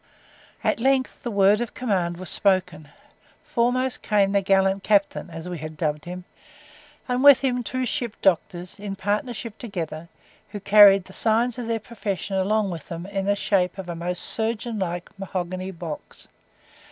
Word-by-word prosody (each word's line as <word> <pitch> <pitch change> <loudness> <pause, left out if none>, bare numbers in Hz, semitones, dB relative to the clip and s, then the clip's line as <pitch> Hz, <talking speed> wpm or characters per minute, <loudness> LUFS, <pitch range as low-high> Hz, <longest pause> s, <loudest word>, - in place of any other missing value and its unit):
At - - +1
length 265 +1 +1
the 240 - -4
word 200 +1 +4
of 240 - -4
command 185 -8 -1
was 185 0 -7
spoken. 180 -6 0 0.5
Foremost 255 -3 0
came 200 -2 +2
the 200 0 +2
gallant 195 0 +2
captain 200 -3 +1
(as 165 +1 -8
we 175 -2 -5
had 155 +1 -7
dubbed 150 0 -2
him), 180 +1 -7 0.8
and 250 +1 0
with 285 -2 +8
him 250 -2 0
two 255 +2 -2
ship 235 -2 -3
doctors, 180 0 0
in 200 -1 -5
partnership 210 +3 -3
together, 170 -7 -5 0.4
who 205 - -6
carried 200 -2 +7
the 190 - -13
signs 230 +4 +1
of 235 - -4
their 230 -1 0
profession 205 -3 -4
along 200 +1 +1
with 165 -4 -8
them 170 +1 -6
in 195 0 -3
the 200 0 +2
shape 190 -3 0
of 190 -2 -7
a 170 - -3
most 175 +1 -3
surgeon 225 0 -2
like 175 -2 -3
mahogany 185 0 -4
box. 170 -4 -8
195 Hz, 165 wpm, -24 LUFS, 180-225 Hz, 0.8 s, with